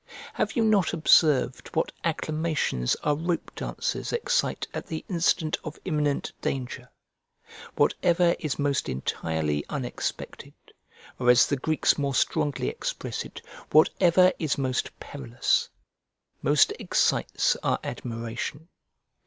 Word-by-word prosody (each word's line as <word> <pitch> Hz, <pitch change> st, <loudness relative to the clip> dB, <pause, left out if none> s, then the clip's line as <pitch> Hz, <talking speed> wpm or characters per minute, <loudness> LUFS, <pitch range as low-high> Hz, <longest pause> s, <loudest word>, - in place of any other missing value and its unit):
Have -, -, -1 dB
you 230 Hz, -, +2 dB
not 210 Hz, -5 st, +3 dB
observed 150 Hz, -5 st, +3 dB
what 160 Hz, -, +1 dB
acclamations 155 Hz, -, 0 dB
our 150 Hz, -, +2 dB
rope 170 Hz, +3 st, -2 dB
dancers -, -, -3 dB
excite 485 Hz, +1 st, 0 dB
at -, -, -5 dB
the 160 Hz, -, -5 dB
instant 170 Hz, -3 st, +1 dB
of 155 Hz, -1 st, -7 dB
imminent 150 Hz, -5 st, 0 dB
danger? 125 Hz, -1 st, -4 dB, 0.9 s
Whatever 175 Hz, 0 st, +3 dB
is 150 Hz, -4 st, -2 dB
most 145 Hz, -1 st, 0 dB
entirely 75 Hz, +2 st, -2 dB
unexpected, 130 Hz, -5 st, -5 dB, 0.6 s
or 125 Hz, -1 st, +2 dB
as 125 Hz, 0 st, +7 dB
the 145 Hz, -, 0 dB
Greeks 155 Hz, +3 st, +1 dB
more 140 Hz, -2 st, -1 dB
strongly 150 Hz, -, 0 dB
express 60 Hz, -, -4 dB
it, -, -, -11 dB, 0.3 s
whatever 180 Hz, +3 st, +5 dB
is 155 Hz, -4 st, 0 dB
most 130 Hz, -2 st, -1 dB
perilous, 125 Hz, -4 st, -1 dB, 0.7 s
most -, -, +4 dB
excites -, -, +1 dB
our -, -, 0 dB
admiration. 115 Hz, +7 st, -5 dB
150 Hz, 115 wpm, -26 LUFS, 125-165 Hz, 0.9 s, as